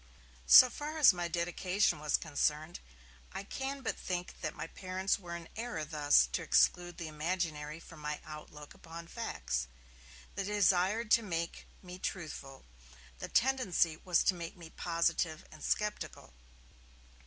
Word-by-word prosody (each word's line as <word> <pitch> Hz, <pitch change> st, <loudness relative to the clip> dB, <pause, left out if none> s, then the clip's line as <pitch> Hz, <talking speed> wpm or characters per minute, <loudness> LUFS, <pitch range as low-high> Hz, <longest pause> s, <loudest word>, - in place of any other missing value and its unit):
So 255 Hz, -, +11 dB
far 300 Hz, +2 st, -5 dB
as 295 Hz, -9 st, +8 dB
my 175 Hz, -1 st, -2 dB
'dedication' 175 Hz, +2 st, 0 dB
was 150 Hz, 0 st, +2 dB
concerned, 155 Hz, +1 st, -1 dB, 0.5 s
I 195 Hz, -, -4 dB
can 270 Hz, +6 st, -4 dB
but -, -, -1 dB
think 180 Hz, -1 st, -5 dB
that -, -, -3 dB
my -, -, -5 dB
parents 185 Hz, +3 st, -2 dB
were 175 Hz, -2 st, -7 dB
in 170 Hz, -1 st, -8 dB
error 225 Hz, -9 st, -3 dB
thus 145 Hz, -, +4 dB
to -, -, -1 dB
exclude 175 Hz, -1 st, +2 dB
the 165 Hz, -, -5 dB
imaginary 155 Hz, -1 st, -3 dB
from 165 Hz, -1 st, -13 dB
my 150 Hz, 0 st, -4 dB
outlook 150 Hz, -1 st, -10 dB
upon 165 Hz, +1 st, -10 dB
facts. 225 Hz, -, -3 dB, 0.7 s
They 195 Hz, -, -3 dB
desired 205 Hz, +2 st, +2 dB
to 230 Hz, -, +7 dB
make 170 Hz, -5 st, -4 dB, 0.2 s
me 180 Hz, 0 st, -9 dB
truthful; 150 Hz, -8 st, -6 dB, 0.5 s
the -, -, -5 dB
tendency 230 Hz, -10 st, +2 dB
was 175 Hz, -1 st, +2 dB
to -, -, +4 dB
make 170 Hz, 0 st, -7 dB
me 165 Hz, -2 st, -11 dB
positive 165 Hz, -2 st, 0 dB
and 155 Hz, -, -12 dB
sceptical. 210 Hz, -, -2 dB
175 Hz, 145 wpm, -33 LUFS, 155-195 Hz, 0.7 s, So